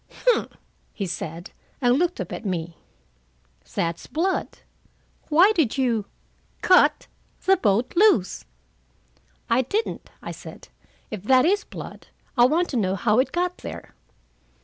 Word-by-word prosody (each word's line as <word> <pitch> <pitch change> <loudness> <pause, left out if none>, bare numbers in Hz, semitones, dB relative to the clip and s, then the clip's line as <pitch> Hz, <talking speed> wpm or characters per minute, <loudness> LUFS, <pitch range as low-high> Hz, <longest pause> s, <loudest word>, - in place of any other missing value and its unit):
"Humph!" - - +2 0.4
he 200 - -3
said, 170 -1 -6 0.3
and 250 +1 +3
looked 355 +2 0
up - - -5
at - - -6
me. 170 -4 -4 1.0
"That's 170 0 -2
blood. 370 +5 0 0.8
Why 345 +7 +6
did 305 - +1
you 235 -6 +1 0.6
cut 370 - +5 0.4
the 385 - +6
boat 225 - +1
loose?" 360 - +3 1.0
"I 235 +3 +3
didn't," 415 - -3
I - - -7
said. - - -11 0.4
"If 215 -4 -5
that 260 +2 +5
is 405 +4 +2
blood, - - -10 0.3
I 240 -2 +6
want 335 +7 +2
to 260 - -2
know 190 -3 +1
how 215 +4 +2
it 260 - +1
got 360 +1 -1
there. - - -9
255 Hz, 135 wpm, -24 LUFS, -, 1.0 s, Why